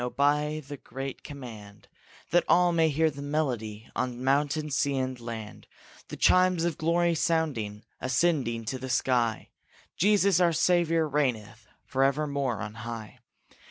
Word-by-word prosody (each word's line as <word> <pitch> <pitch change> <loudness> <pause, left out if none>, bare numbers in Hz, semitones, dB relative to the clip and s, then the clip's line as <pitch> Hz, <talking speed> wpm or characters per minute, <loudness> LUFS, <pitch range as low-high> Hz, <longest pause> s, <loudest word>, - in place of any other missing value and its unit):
Obey 150 +4 +1
the 145 -1 -9
great 135 0 -7
command, 110 -8 -10 0.4
That 175 +1 +4
all 175 0 +4
may 165 -1 +3
hear 155 +2 +2
their 140 0 -9
melody 120 -8 -2
On 125 0 -2
mountain, 145 +3 +1
sea, 140 0 +1
and 130 -1 -2
land, 115 -3 -8 0.4
The - - -8
chimes 185 -2 +4
of 170 -3 -1
glory 170 +2 +2
sounding, 140 -11 -1 0.2
Ascending 130 -4 0
to 130 +4 -3
the 130 +1 -6
sky; 120 -3 +1 0.5
Jesus 200 -1 +3
our 175 -2 +3
Savior 165 -1 +2
reigneth 115 -7 -2 0.2
Forever 135 +3 +1
more 140 -6 -2
on 105 -1 -5
high. 115 -2 -7
140 Hz, 140 wpm, -28 LUFS, 120-160 Hz, 0.5 s, That